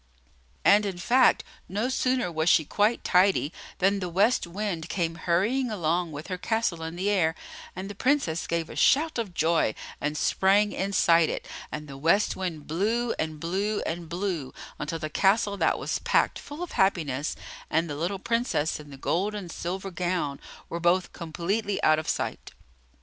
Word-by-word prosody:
And, 205 +1 +6
in 195 -3 -3
fact, 250 +8 +4 0.3
no 210 +6 -1
sooner 255 -6 0
was 160 +1 +1
she 160 -4 +5
quite 210 +8 +1
tidy 180 -4 +3 0.2
than 195 +2 +2
the 180 -2 -3
West 200 +4 +2
Wind 180 -3 -3
came 170 -3 -1
hurrying 195 +11 +1
along 175 -4 0
with 150 +1 -7
her 185 -2 -4
castle 220 -6 -1
in 160 +1 -5
the 185 +3 -2
air; 165 -5 +2 0.4
and 185 +2 -5
the 205 - -6
Princess 205 - 0
gave 170 -1 -1
a - - -9
shout 305 -2 +3
of 200 -6 -4
joy 160 -8 +2 0.3
and 150 +1 -1
sprang 200 +5 +3
inside 170 -4 +3
it; - - -4 0.2
and 150 0 -5
the 135 -1 -9
West 170 +8 +3
Wind 175 -6 -4
blew, 225 +9 0
and 155 -1 -2
blew, 195 +6 -1
and 170 0 -4
blew, 175 -6 -3 0.2
until 165 +2 -3
the 155 - -4
castle 200 +6 +2
that - - +2
was - - -2
packed - - +1
full 295 +4 -7
of 355 - -6
happiness, 155 -8 +1 0.3
and 165 +2 +1
the 145 - -4
little 175 +6 -2
Princess 230 -8 0
in 150 -1 -11
the 140 - -10
gold 195 +9 -1
and 185 -5 -6
silver 190 +4 -4
gown, 175 -5 -2 0.3
were 170 - -4
both 175 +2 +2
completely 190 +5 -2
out 155 0 +5
of 155 - -5
sight. - - -3
180 Hz, 175 wpm, -27 LUFS, 160-205 Hz, 0.4 s, And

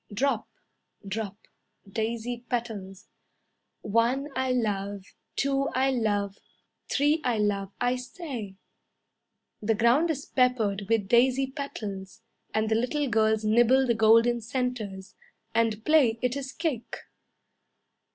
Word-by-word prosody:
Drop, 240 +2 0 0.6
Drop, 205 0 -4 0.5
Daisy 230 +3 -3
petals. 220 -4 -4 0.8
"One 235 +7 +1
I 260 0 0
love, 200 -5 -1 0.3
Two 275 0 +1
I 265 +1 +3
love, 205 -5 -1 0.5
Three 295 +3 +2
I 245 -3 +1
love 200 -2 0
I 245 +1 +1
say..." 250 - -7 1.1
The 220 +1 +1
ground 245 +10 +3
is 285 -3 -2
peppered 220 -6 +1
with 225 -4 +2
daisy 255 +4 +4
petals, 210 -7 -6 0.3
And 220 0 0
the 220 - +1
little 255 +6 0
girls 220 -1 +2
nibble 240 +4 +4
the 240 - +2
golden 230 +2 +4
centres, 225 -5 -3 0.4
And 225 -1 +1
play 280 -8 +4
it 250 +1 +1
is 270 -1 -4
cake. 300 -9 -3
230 Hz, 115 wpm, -27 LUFS, 210-260 Hz, 1.1 s, daisy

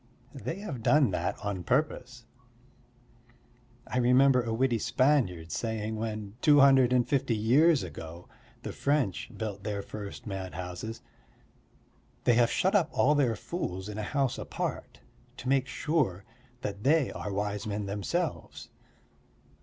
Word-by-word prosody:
They 140 +4 -5
have 135 - -5
done 140 -1 +4
that 90 -1 -2
on 100 -3 -3
purpose. 125 - -1 1.6
I 125 - -2
remember 125 +1 +5
a 115 -1 -4
witty 120 0 +1
Spaniard 105 - +1
saying 110 +2 -2
when, 110 -2 -4
two 145 -2 +6
hundred 135 -3 +6
and 125 -1 +3
fifty 135 -3 +1
years 140 - +4
ago, 85 +1 -9 0.4
the - - -4
French 140 -9 0
built 105 -3 -4
their 100 -1 -3
first 105 -2 -8
madhouses: 95 +2 -6 1.2
"They 120 - +4
have 115 0 +4
shut 190 +2 +1
up 180 -6 +3
all 150 - +3
their 135 -6 +2
fools 95 - -5
in 105 0 -6
a - - -1
house 135 +4 -1
apart, - - -5 0.4
to - - -8
make 135 -1 +2
sure 130 - -1 0.4
that 100 -2 -5
they 145 -1 +3
are 105 - -5
wise 105 +1 -2
men 105 0 -3
themselves." 105 - -3
115 Hz, 140 wpm, -29 LUFS, 100-135 Hz, 1.6 s, two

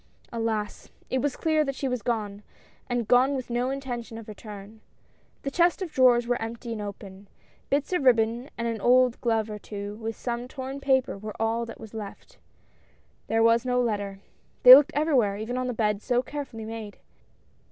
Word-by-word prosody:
Alas! 225 -2 -3 0.2
it 260 - +1
was 290 -1 -1
clear 315 -1 +1
that 275 -2 -3
she 270 - -2
was 250 -2 -2
gone, 210 -3 -2 0.5
and 240 -3 -1
gone 260 +3 +4
with 255 -2 -5
no 245 +2 0
intention 245 -4 -5
of 225 - -10
return. 210 0 -10 0.6
The 275 - -3
chest 345 +2 +3
of 345 - -6
drawers 250 -4 +4
were 245 0 -1
empty 230 +1 -5
and 220 -2 -4
open. 200 -1 -9 0.4
Bits 285 +5 0
of 360 - +1
ribbon 235 0 +2
and 235 - -2
an 225 -2 -3
old 250 +1 +4
glove 225 -2 +1
or 210 -1 -6
two, 205 0 -7
with 225 0 -5
some 240 0 -4
torn 265 +1 -6
paper 265 -5 +1
were 215 +1 -8
all 225 +1 0
that 230 - -9
was 220 -1 -11
left. 210 -3 -9 0.9
There 225 0 +2
was 230 0 +4
no 250 -1 +1
letter. 205 -4 -2 0.4
They 250 - +13
looked 290 +3 +7
everywhere, 265 -10 +2
even 220 +4 -4
on 255 0 -1
the - - -1
bed 210 -3 0
so 245 +1 +1
carefully 260 -5 -6
made. 220 -2 -7
235 Hz, 185 wpm, -26 LUFS, 220-255 Hz, 0.9 s, They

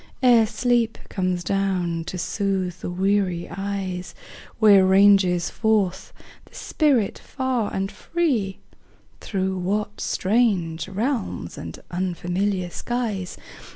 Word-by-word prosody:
Ere 235 -3 +6
sleep 235 +1 +1
comes 185 -2 -1
down 185 -4 0
to 185 - -5
soothe 190 -1 -1
the - - -5
weary 185 -1 0
eyes, 195 -2 -4 0.4
Where 205 -4 +7
ranges 190 -2 +4
forth 205 -4 0 0.3
the - - -20
spirit 275 -10 +1
far 260 -5 -2
and 195 +1 -2
free? 225 - -1 0.6
Through 190 -2 -2
what 205 +3 -2
strange 185 -6 +1
realms 210 - -2
and 80 0 -7
unfamiliar 180 +1 -1
skies. 220 -7 -3
195 Hz, 105 wpm, -23 LUFS, 180-220 Hz, 0.6 s, Where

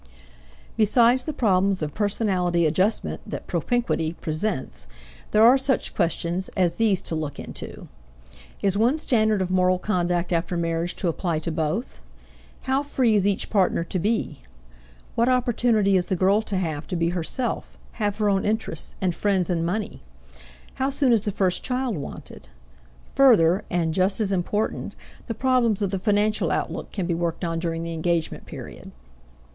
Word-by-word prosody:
Besides 235 +3 +4
the 310 - -2
problems 195 - +1
of 150 -1 -4
personality 190 -5 +1
adjustment 185 +8 0
that - - -6
propinquity 235 -10 -1
presents, 160 -1 -3 0.4
there 215 - +4
are 250 +4 +7
such 265 -1 -1
questions 170 +1 -1
as 175 -2 +1
these 215 -5 +2
to - - -4
look 155 -3 -4
into: - - -8 0.8
Is 195 -1 +2
one 245 +7 +3
standard 220 -9 +2
of 185 - -4
moral 185 0 +3
conduct 175 -2 -1
after 170 +1 0
marriage 165 +1 -1
to 185 - -2
apply 170 0 -1
to 165 +2 -3
both? 160 - -2 0.6
How 265 +1 +1
free 260 -5 +1
is 200 -2 +3
each 200 -1 -1
partner 190 -4 +2
to 180 +2 -3
be? 215 - -1 0.7
What 235 +2 +2
opportunity 240 -5 +2
is 180 -1 +1
the 190 - 0
girl 195 +4 +3
to 205 -3 -3
have 160 -4 -3
to - - -3
be 165 0 +1
herself, 180 +9 -3
have 205 -3 -2
her 210 -1 +1
own 195 -1 +2
interests 215 -7 -2
and 185 -2 +1
friends 190 0 0
and 165 -2 0
money? 200 +5 -3 0.8
How 265 - +2
soon 275 -2 +2
is 225 - +3
the 210 0 -2
first 185 -2 0
child 255 -3 -1
wanted? 140 - -8 0.7
Further 210 -8 +5
and 165 -2 0
just 190 +3 +1
as 205 -3 0
important 195 +3 -2 0.3
the 230 - -3
problems 245 -4 +2
of 200 -3 -1
the 195 - -1
financial 210 +1 +1
outlook - - -3
can 190 -4 -3
be 170 - 0
worked 170 +1 -2
on 165 -1 -2
during 165 -1 -2
the 165 0 -4
engagement 165 0 -2
period. - - -9
190 Hz, 165 wpm, -24 LUFS, 170-220 Hz, 0.8 s, are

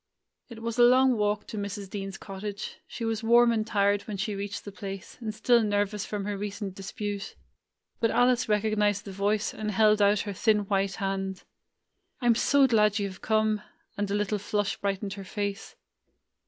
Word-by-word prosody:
It 225 -1 -10
was 230 +1 -3
a - - +8
long 255 +1 +6
walk 210 -1 0
to 215 - -6
Mrs. 200 0 -5
Dean's 195 0 -5
cottage. 200 +1 -6
She 230 - -5
was 225 -1 -1
warm 235 +1 +5
and 220 -1 0
tired 200 -1 +2
when 210 -2 -4
she 205 +2 -2
reached 200 0 -5
the 205 - -6
place, 195 -1 -7
and 220 -2 -3
still 235 +2 +3
nervous 205 -1 0
from 205 -2 -3
her 205 0 -2
recent 200 -1 -5
dis 195 +1 -8
pute. 205 -1 -4 0.6
But 230 - +2
Alice 245 0 +3
recognized 210 -1 +1
the 200 - -7
voice, 205 +2 0
and 215 -1 -4
held 210 +1 +4
out 205 0 +4
her 205 - -4
thin 210 +2 +2
white 195 -1 0
hand. 195 -1 -3 0.8
"I 250 - -5
'm 240 - +6
so 275 +4 +4
glad 210 -4 +3
you 200 -2 -1
have 185 - -12
come!" 215 -1 +1 0.3
and 205 -1 -2
a 200 - 0
little 210 0 0
flush 205 0 -1
brightened 200 0 -2
her 200 -1 -7
face. 205 +1 -4
205 Hz, 195 wpm, -28 LUFS, 200-220 Hz, 0.8 s, a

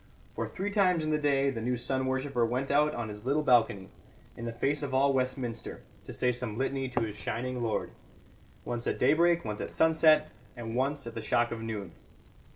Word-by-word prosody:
For - - -3
three 200 +2 -4
times 185 -5 +3
in 155 - -1
the 150 - +2
day 140 -2 +2
the 115 -4 -5
new 125 +2 0
sun 130 +2 -1
worshipper 130 -1 0
went 125 +4 -1
out 150 +1 +3
on 120 -2 -3
his 105 0 -8
little 140 +4 +1
balcony, 115 -8 +3 0.4
in 120 - -7
the 115 - -3
face 140 +5 0
of 135 -2 -3
all 140 +1 +4
Westminster, 130 -3 -3 0.2
to - - -8
say 125 - +1
some 120 -3 -3
litany 135 0 -1
to 120 -1 -1
his 110 -2 -3
shining 120 +5 -3
lord: 115 -2 -1 0.7
once 120 -1 -3
at - - 0
daybreak, 170 +5 +3
once 105 -1 -4
at - - -4
sunset, 160 -1 +4 0.3
and 115 -1 -5
once 140 +2 0
at 115 - -6
the 115 - -5
shock 120 +2 +1
of 115 -1 -4
noon. 105 -5 -5
130 Hz, 205 wpm, -30 LUFS, 115-145 Hz, 0.7 s, all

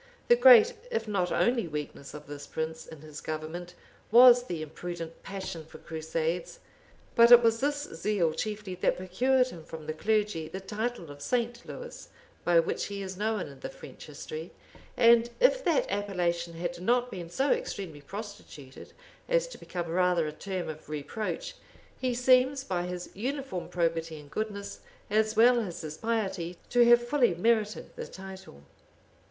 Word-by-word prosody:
The 480 - +8
great, 480 -1 +8 0.2
if 225 - -2
not 190 -4 0
only 235 -6 +2
weakness 150 -2 -6
of 150 - -9
this 145 0 -8
prince, 160 0 -4
in 160 -3 -11
his 155 -1 -9
government, 160 +3 -5 0.3
was 245 +1 +8
the 170 -8 -4
imprudent 165 +1 -7
passion 190 -4 -6
for 155 - -13
crusades; 160 +2 -3 0.6
but 235 0 +7
it 240 0 +10
was 230 0 +3
this 290 +2 0
zeal 175 - 0
chiefly 210 -1 -4
that 180 - 0
procured 250 +8 +2
him 165 -8 -10
from 160 -1 -9
the 155 - -3
clergy 205 -2 0
the 190 +4 -6
title 210 -3 -4
of 145 0 -12
St. 240 - -1
Lewis, - - -9 0.3
by 175 -1 +5
which 165 - -1
he 200 -1 -5
is 190 -1 -6
known 215 +1 -1
in 140 -5 -8
the - - -6
French - - -12
history 465 0 -7 0.5
and 235 0 +6
if - - +4
that 335 -5 +3
appellation 175 -4 -1
had 175 +1 -4
not 245 +5 +1
been 175 -3 -6
so 270 +10 +1
extremely 195 - -3
prostituted 195 -6 -10 0.4
as - - +2
to - - -11
become 175 -2 -4
rather 180 -1 +2
a - - -3
term 185 +2 -4
of 155 0 -8
reproach, 215 - -4 0.4
he 255 -2 0
seems, 255 +2 +4
by 180 -7 -2
his 180 0 -6
uniform 260 -3 -4
probity 165 -2 -1
and 145 -1 -15
goodness, 200 -2 -4 0.3
as 215 +1 +2
well 240 +2 +6
as 190 -7 -4
his 155 -2 -6
piety, 195 -6 -2
to 245 0 +6
have 240 0 +6
fully 245 -9 +3
merited 215 +3 0
the - - -6
title. 190 - -11
195 Hz, 165 wpm, -29 LUFS, 165-240 Hz, 0.6 s, it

